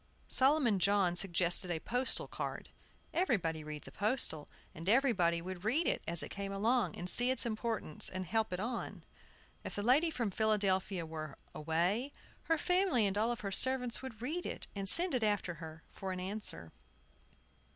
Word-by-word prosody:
Solomon 265 -6 +3
John 195 -2 +2
suggested 180 0 +3
a 170 -2 -2
postal 250 +8 0
card. - - -6 0.4
Everybody 180 - 0
reads 150 -1 -7
a - - -10
postal, 205 - -1 0.2
and 165 +4 -5
everybody 195 -10 +2
would 185 0 -7
read 270 +11 +1
it - - 0
as 170 0 +4
it - - -6
came 195 0 -5
along, 225 +5 0
and 175 - -6
see 245 +7 +8
its 260 0 +5
importance, 220 -7 -3
and 185 0 -5
help 220 +2 -1
it 180 - -3
on. 235 +3 -5 0.6
If - - -6
the 205 - -3
lady 280 +9 +4
from 240 -9 -3
Philadelphia 195 -4 0
were 155 -3 -7 0.2
away, 175 - -1 0.3
her 325 - +1
family 360 - +2
and 195 -1 -1
all 225 +3 +1
her 205 -3 -6
servants 250 +2 0
would 240 -4 -9
read 325 +7 -3
it, - - -5
and 195 -1 -2
send 350 - +7
it 250 - 0
after 205 -4 0
her, 160 0 -9
for 190 -1 -6
answer. 185 - -5
205 Hz, 170 wpm, -33 LUFS, 180-245 Hz, 0.6 s, see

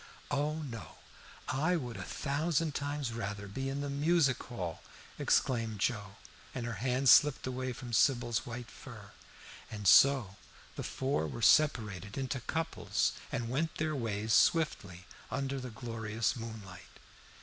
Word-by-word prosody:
"Oh 150 +2 -1
no! 115 - -8 0.5
I 155 +7 +1
would 125 -8 -4
a 95 - -6
thousand 150 - -1
times 145 -4 -3
rather 105 -2 -4
be 135 +7 -4
in 140 +1 -3
the 145 - -3
Music 145 -2 +2
Hall!" 90 -10 -5 0.4
exclaimed 115 -4 +1
Joe, 100 -3 -1 0.4
and 125 -2 -3
her 120 - -3
hand 130 +1 +1
slipped 150 +2 +6
away 130 0 -3
from 120 0 -8
Sybil's 120 -2 +2
white 120 0 -7
fur. - - -11 0.6
And 105 -2 -4
so 125 -2 +6 0.4
the - - -4
four 130 - -1
were 65 -5 -6
separated 105 - +3
into 135 0 -2
couples, 135 -9 -1 0.2
and 120 -5 -2
went 155 +7 -1
their 155 0 -1
ways 110 -3 -1
swiftly 100 - +2 0.2
under 135 +1 -2
the 125 -1 -6
glorious 115 0 -2
moonlight. 110 -6 -9
125 Hz, 140 wpm, -32 LUFS, 110-140 Hz, 0.6 s, slipped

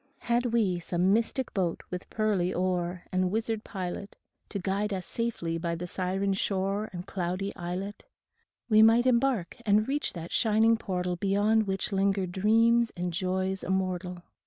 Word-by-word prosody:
Had 240 +1 +1
we 215 -7 +1
some 180 +3 +1
mystic 235 +4 0
boat 180 -5 -1
with 180 0 -5
pearly 205 -5 +1
oar 180 -1 -1
And 185 -1 +1
wizard 220 +1 -1
pilot, 190 0 -5 0.3
To 205 - -4
guide 200 +2 -1
us 185 -1 -5
safely 170 -8 -2
by 170 0 -2
the 175 +2 -5
siren 190 +2 -1
shore 195 +2 -1
And 175 0 -6
cloudy 185 +1 -3
islet, 185 - -5 0.6
We 215 -2 +6
might 225 +2 +6
embark 245 -6 +1
and 215 0 +3
reach 290 +2 -1
that 170 -1 -7
shining 225 0 +4
portal 180 -4 -2
Beyond 205 +3 +2
which 195 +2 -1
linger 195 0 +1
dreams 225 +5 +3
and 175 0 -2
joys 185 +2 -1
immortal. 185 -1 -2
195 Hz, 155 wpm, -28 LUFS, 180-220 Hz, 0.6 s, We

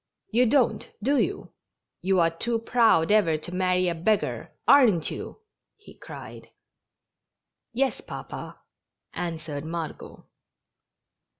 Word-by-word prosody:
"You 240 +3 +4
don't, 255 0 +2
do 280 +4 +3
you? - - -2 0.5
You 190 +1 +2
are 165 0 +3
too 230 +8 -1
proud 225 -7 +3
ever 195 -7 +4
to 175 +3 -8
marry 185 0 +1
a 175 - +1
beggar, 200 +6 -1 0.2
aren't 230 - +5
you?" - - -7 0.4
he 425 - -16
cried. - - -10 1.2
"Yes, 265 +3 0
papa," - - -8 0.6
answered 160 -4 -5
Margot. 165 -1 -6
185 Hz, 110 wpm, -26 LUFS, 165-235 Hz, 1.2 s, aren't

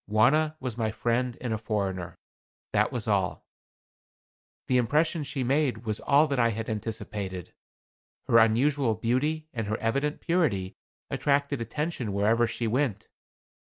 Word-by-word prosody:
Wauna 145 +9 +3
was 125 -3 -5
my 110 -1 +1
friend 120 +2 -1
and 120 -3 -2
a 110 - -2
foreigner 100 -5 -3 0.6
that - - +2
was - - -3
all. - - 0 1.2
The 130 - +3
impression 150 +6 +1
she 140 -2 -3
made 130 -3 0
was 110 -1 -1
all 145 +2 +4
that 140 -4 -1
I 115 -1 +4
had 110 0 -3
anticipated. 105 -4 -5 0.7
Her 115 - +6
unusual 120 +2 +3
beauty 145 +8 0
and 115 -3 -3
her 110 +1 -1
evident 140 +7 -1
purity 140 - 0 0.4
attracted 140 -2 +1
attention 125 -2 -3
wherever 110 +4 +3
she 115 +1 -3
went. 115 -2 -1
120 Hz, 140 wpm, -27 LUFS, 110-140 Hz, 1.2 s, Her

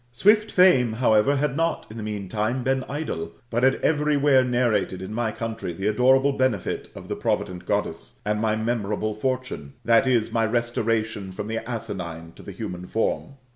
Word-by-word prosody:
Swift 210 - +3
Fame, 135 - +5
however, 110 +3 +3
had 140 -1 0
not 165 +2 0
in - - -9
the 115 - -5
meantime 105 +4 -2
been 130 +1 +1
idle, 85 - -4 0.2
but 120 +1 0
had 130 +1 +4
every 150 -1 +2
where 140 -2 +5
narrated 120 -7 +1
in 95 +3 -6
my 115 -1 -1
country 110 -5 -4
the 95 +4 -5
adorable 130 +6 +4
benefit 130 -8 -1
of - - -9
the - - -3
provident 90 -1 -2
Goddess, - - -2
and 105 0 0
my 110 -1 +1
memorable 110 -1 -1
fortune 130 +4 -3
[/>., 125 - -37 0.5
my 115 0 +1
restoration 115 -3 -1
from 95 +2 -5
the 115 +1 -2
asinine 85 -8 -5
to - - -13
the - - -8
human 90 -3 -6
form]. 115 +6 -1
115 Hz, 175 wpm, -24 LUFS, 105-130 Hz, 0.5 s, Fame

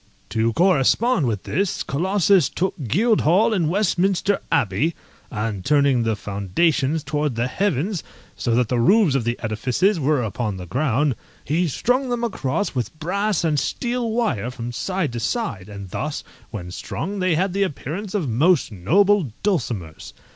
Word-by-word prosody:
To 115 +2 +1
correspond 180 - +3
with 105 -4 -2
this, 190 +4 -1
Colossus 185 +2 +2
took 190 +2 -1
Guildhall 210 - +3
and 170 -7 +1
Westminster 195 +1 +1
Abbey, 145 - +1 0.3
and 105 -5 -3
turning 140 -2 +3
the 115 -1 0
foundations 135 - 0
towards 150 -4 -1
the 120 +1 0
heavens, 180 +3 -1 0.3
so 115 -2 0
that 125 -1 +2
the 125 - +1
roofs 190 - +4
of 135 -4 0
the 120 +1 -1
edifices 125 - +1
were 145 -2 +1
upon 110 -1 -3
the 90 - -7
ground, 135 - +1 0.3
he 170 +5 +1
strung 250 - 0
them 240 -1 -1
across 200 - -1
with 130 +4 -3
brass 200 +4 0
and 155 -3 +2
steel 240 - -2
wire 155 - 0
from 120 -1 -6
side 185 0 -2
to 120 - -3
side, 115 - -3
and 100 -3 -9
thus, 150 +7 -3 0.3
when 90 -5 -7
strung, 200 - -5
they 185 -3 +2
had 185 +3 0
the 200 - -1
appearance 185 +3 -3
of 180 -8 0
most 145 +7 +2
noble 175 - +2
dulcimers. 120 - -2
150 Hz, 155 wpm, -22 LUFS, 120-195 Hz, 0.3 s, roofs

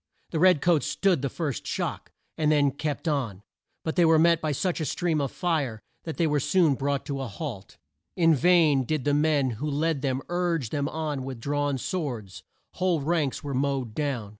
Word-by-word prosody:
The 160 - -1
red 180 -4 +5
coats 170 -4 +3
stood 185 -8 +1
the 140 - -1
first 150 -5 -4
shock, - - -3 0.2
and 155 -1 +1
then 145 -2 +3
kept 150 +3 -4
on, 115 -11 -1 0.4
but 160 +2 -2
were 165 -2 +6
met 170 +1 +4
by 155 - -1
such 175 +4 -1
a - - -1
stream 165 -1 0
of 140 - -2
fire 150 - -1 0.3
that 160 - -5
they 170 - +2
were 150 -2 +2
soon 165 +1 +3
brought 140 +1 -2
to 140 -2 -3
a 135 - -3
halt. 110 -4 -7 0.4
In 165 -2 +4
vain 155 -3 +4
did 150 +1 -2
the 145 - +2
men 145 -3 +2
who 150 - -1
led 150 0 0
them 135 -1 -1
urge 175 -8 -1
them 145 -1 -1
on 150 -4 -3
with 130 -2 -6
drawn 145 +2 -1
swords. 125 - -4 0.3
Whole 180 -4 0
ranks 155 -2 -1
were 140 -1 -4
mowed 135 -3 -1
down. 135 -8 -2
145 Hz, 195 wpm, -26 LUFS, 135-165 Hz, 0.4 s, were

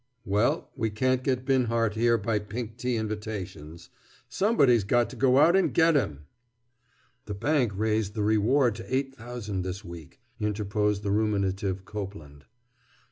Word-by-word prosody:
"Well, 105 +4 0
we 115 -4 -1
can't 130 +4 0
get 130 -1 -1
Binhart 115 -5 +1
here 115 +1 +3
by 110 0 -1
pink 110 +2 -6
tea 125 -1 -1
invitations. 105 -7 -5 0.4
Somebody's 140 - +3
got 120 +4 +1
to - - -9
go 130 -1 +3
out 165 +5 +6
and 195 - +3
get 165 0 +5
him!" 75 - -1 1.0
"The 105 - -5
bank 135 +1 +1
raised 110 0 0
the 105 - -1
reward 110 +4 +3
to 115 +3 -4
eight 135 0 -1
thousand 115 -6 -5
this 95 +3 -5
week," 85 -4 -11 0.2
interposed 105 0 -1
the 100 - -1
ruminative 100 -2 0
Copeland. 95 -9 -8
110 Hz, 145 wpm, -27 LUFS, 100-125 Hz, 1.0 s, out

